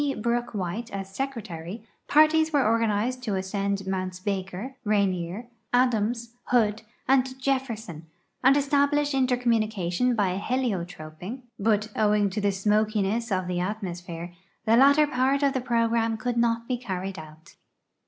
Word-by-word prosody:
Brook 240 +1 -1
White 200 +5 -3
as 195 -1 -6
secretary, 215 -7 -5 0.2
parties 315 +1 +5
were 285 -4 +3
organized 230 +2 +1
to 215 -6 -2
ascend 195 +1 -2
Mounts 185 -1 -3
Baker, 195 +5 -4
Rainier, 200 0 0 0.2
Adams, 235 -1 +1
Hood, 220 -3 +2 0.3
and 260 0 +2
Jefferson 230 - -2 0.4
and 270 +2 +6
establish 285 +1 +2
inter 260 -2 +2
communication 220 -2 +1
by 190 -3 +1
heliotroping, 195 -3 -3 0.2
but, 210 0 +1
owing 210 -2 +2
to 210 - -2
the 200 0 +2
smokiness 210 +2 0
of 185 -1 0
the 180 -1 -2
at 205 +5 -2
mosphere, 175 -1 -6 0.3
the 225 - +4
latter 280 +4 +6
part 270 +1 +1
of 280 -1 +3
the 260 - -1
program 230 -2 +1
could 245 +2 -2
not 230 0 +1
be 250 -2 -1
carried 190 -4 -4
out. 155 +2 -13
220 Hz, 140 wpm, -26 LUFS, 190-250 Hz, 0.4 s, and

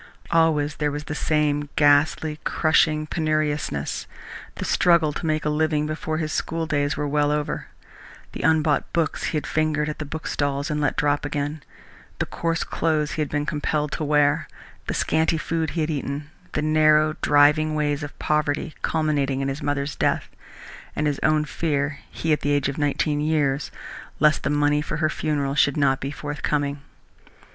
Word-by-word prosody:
Always 155 -3 +2
there 150 -1 0
was 145 +1 -4
the 150 - -5
same 145 -1 0
ghastly, 150 +1 +3
crushing 155 -1 +2
penuriousness, 155 - -1 0.5
the - - -4
struggle 170 -4 +3
to 165 - -5
make 155 -1 0
a - - +2
living 150 0 +1
before 155 0 -3
his 155 -1 -2
schooldays 155 -3 -1
were 150 0 -1
well 145 0 +2
over, 150 0 -2 0.6
the - - -6
unbought 155 -1 +2
books 165 -3 0
he 155 - -1
had 150 - -3
fingered 155 -1 0
at 150 - -5
the 150 - -3
bookstalls 145 -1 -2
and 150 0 -1
let 145 - +1
drop 145 0 +1
again, 145 +1 -3 0.6
the - - -1
coarse 165 0 -2
clothes 155 -2 0
he 155 - -2
had 150 - -1
been 145 0 -1
compelled 150 0 -1
to - - -3
wear, 150 +1 +2 0.4
the - - -2
scanty 160 +1 +1
food 160 0 -1
he 165 - -2
had 155 +1 0
eaten, 145 0 -4 0.2
the 150 - -1
narrow, 155 0 +4
driving 150 +2 +4
ways 145 -1 0
of 145 0 -7
poverty, 150 +1 0
culminating 145 -4 0
in 135 0 -1
his 135 +3 -4
mother's 145 0 -2
death - - 0 0.7
and 150 - 0
his 145 -2 0
own 155 0 +2
fear 145 -2 -1
he, 160 -1 -1
at 150 - +1
the 145 - -1
age 145 -2 +1
of 140 +2 -4
nineteen 145 +1 0
years 150 -2 +1 0.5
lest 150 0 +4
the - - -1
money 145 0 +2
for 155 0 -4
her 155 -1 +1
funeral 145 -3 -1
should 140 0 +3
not 135 -2 +2
be 135 - -3
forthcoming. 145 -1 -2
150 Hz, 175 wpm, -24 LUFS, 145-155 Hz, 0.7 s, narrow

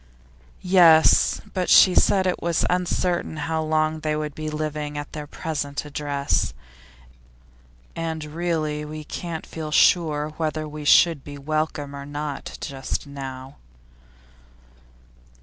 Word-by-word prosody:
'Yes, 175 -4 +5
but 185 -2 -1
she 185 - +7
said 190 +1 +3
it 185 - -1
was 170 -1 0
uncertain 180 -2 -1
how 160 +1 -2
long 155 0 0
they 155 -1 -1
would 150 -1 -3
be 155 +1 -5
living 150 -1 -4
at 145 - -7
their 150 -1 -6
present 145 -2 -4
address. 145 - -1 1.4
And 160 -2 -4
really, 155 -1 -2
we 155 0 -7
can't 165 +1 -6
feel 160 -2 -6
sure 150 -1 +3
whether 155 -1 -2
we 150 0 -8
should 160 -1 +5
be 145 -1 -9
welcome 145 -1 -3
or 140 0 -8
not 145 -1 -5
just 135 +1 -4
now. 135 -1 -8
155 Hz, 125 wpm, -23 LUFS, 145-160 Hz, 1.4 s, she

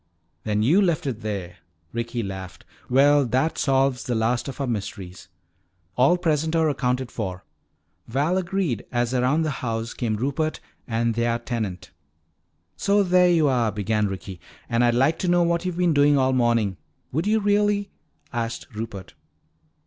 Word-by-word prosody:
"Then 105 0 +1
you 165 - +4
left 170 -7 +1
it 120 -5 -3
there," 95 -5 -5 0.4
Ricky 115 0 -3
laughed. 95 -2 -7 0.2
"Well, 140 +3 +5
that 130 +7 0
solves 135 -2 +2
the 120 - -1
last 115 +3 0
of 135 - -7
our 140 - 0
mysteries." 100 -6 -5 0.7
"All 135 +8 +4
present 160 -2 0
or 160 -1 +3
accounted 125 -2 -1
for," 95 -4 -5 0.6
Val 140 +9 0
agreed 175 - -1
as 120 0 0
around 130 +6 +2
the 155 - -1
house 115 -1 -3
came 115 -3 -2
Rupert 140 +7 -1 0.3
and 115 0 0
their 115 +1 0
tenant. 115 -6 -4 0.8
"So 200 - +2
there 180 -1 +4
you 165 -4 +4
are," 120 -5 +2
began 105 +1 0
Ricky. 95 -2 -7 0.3
"And 120 0 +1
I'd 120 -1 +3
like 135 +6 +2
to 185 - -1
know 175 0 +4
what 170 +1 0
you've 180 -2 -2
been 175 -2 +2
doing 145 0 +4
all 130 -1 +2
morning 115 -6 +1 0.2
" - - -45
"Would 160 +8 -1
you 220 +1 +3
really?" 205 -1 +1 0.4
asked 115 -1 -3
Rupert. 105 -4 -7
125 Hz, 165 wpm, -24 LUFS, 115-160 Hz, 0.8 s, Well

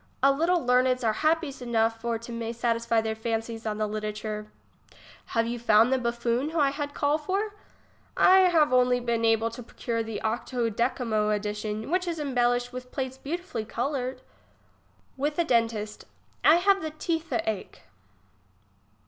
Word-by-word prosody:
A 275 - +7
little 335 +3 +1
leameds 250 0 +3
are 220 -1 +2
happies 310 +1 0
enough 225 -2 0
for 235 0 -1
to 230 +1 -10
may 230 0 -4
to - - -17
satisfy 230 -1 +1
their 220 0 -2
fancies 225 0 -3
on 210 -1 -2
the 215 - 0
literature. 215 0 -4 0.7
Have 230 0 0
you 235 +1 -3
found 225 +2 +4
the 260 - +2
Buffon 235 +3 -1
who 325 0 -2
I 280 -2 +4
had 285 0 -5
call 290 +1 +1
for? 395 +7 -2 0.6
I 375 0 +6
have 310 -6 +3
only 250 0 +4
been 235 -1 -1
able 225 0 +2
to 235 - -8
procure 230 0 -3
the 225 -1 -4
octo 230 +1 -1
decimo 225 -2 0
edition, 210 +3 -3
which 365 0 +1
is 335 -2 -2
embellished 245 -3 0
with 250 0 -8
plates 260 -1 -4
beautifully 315 -6 -4
coloured. 255 +3 -3 1.0
IVith 295 +2 -1
a 340 - +3
dentist. 225 -6 0 0.4
I 310 - +7
have 390 +3 +3
the 315 - -3
teetht 325 +1 -2
ache. 215 -4 -4
240 Hz, 165 wpm, -27 LUFS, 225-285 Hz, 1.0 s, A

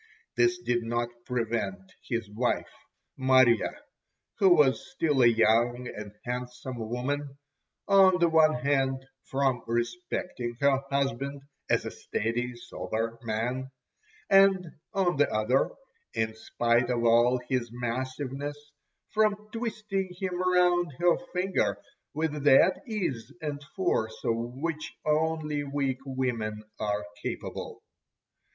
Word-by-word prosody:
This 120 0 +3
did 120 0 0
not 120 +1 -1 0.2
prevent 110 -6 -2 0.2
his 115 -3 -1
wife 115 +4 -1 0.5
Marya, 130 -4 +4 0.6
who 195 - +6
was 135 -4 +3
still 155 - +1
a 120 - +7
young 120 +2 +3
and 105 -1 -7
handsome 125 0 -5
woman, 140 +3 -3 0.5
on 190 -2 +6
the 170 -1 +4
one 160 -1 +5
hand 135 0 0 0.2
from 135 -2 0
respecting 120 0 -3
her 140 -1 +3
husband 140 0 -1 0.3
as - - +2
a - - -4
steady, 120 +3 -2
sober 115 -1 -4
man, 120 +4 -2 0.6
and 195 -3 +5 0.2
on 180 -5 +1
the 145 - +3
other, 110 +5 +2 0.5
in 110 0 0
spite 120 +2 +1
of 120 -1 0
all 120 +2 +5
his 125 -3 -1
massiveness, 130 +4 -3 0.5
from 210 -1 +1
twisting 215 -5 -2
him 190 -2 -2 0.2
round 175 -3 +3
her 175 +1 +4 0.2
finger 185 +1 0 0.4
with 150 -2 -1
that 145 +6 +5
ease 180 - -3
and 145 -2 -4
force 110 - 0
of 115 - +2
which 135 +7 -4
only 155 -1 0
weak 140 -2 -1
women 115 -5 -2 0.2
are 105 -1 -1 0.2
capable. - - -5
130 Hz, 120 wpm, -28 LUFS, 120-155 Hz, 0.6 s, a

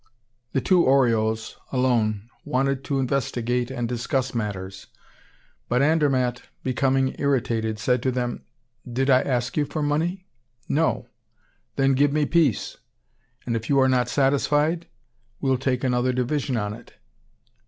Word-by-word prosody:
The 135 - +1
two 180 +2 +4
Oriols 110 -4 +2
alone 115 -5 +1 0.2
wanted 135 +1 0
to 140 +1 -1
investigate 125 -2 -1
and 120 -3 -3
discuss 125 +2 -1
matters. 95 -4 -4 0.8
But 125 +2 +2
Andermatt, 135 -5 +2 0.2
becoming 130 0 +1
irritated, 115 -6 0
said 125 +3 +1
to 130 - 0
them: 120 -1 -3 0.5
"Did 135 +3 +1
I 130 0 +6
ask 125 -2 -1
you 150 - +2
for 155 +1 -3
money? 165 +6 -1 0.4
No! 160 +3 0 0.7
Then 135 0 +3
give 140 +2 +3
me 150 0 +1
peace! 155 -8 +1 0.7
And, 115 - -1
if 115 0 -4
you 140 -1 +4
are 130 - +5
not 125 -2 +2
satisfied, 145 +4 +1 0.5
we'll 130 -2 +1
take 130 -1 -1
another 125 0 +1
division 130 +1 -1
on 105 -1 -2
it." - - -14
130 Hz, 135 wpm, -24 LUFS, 120-140 Hz, 0.8 s, I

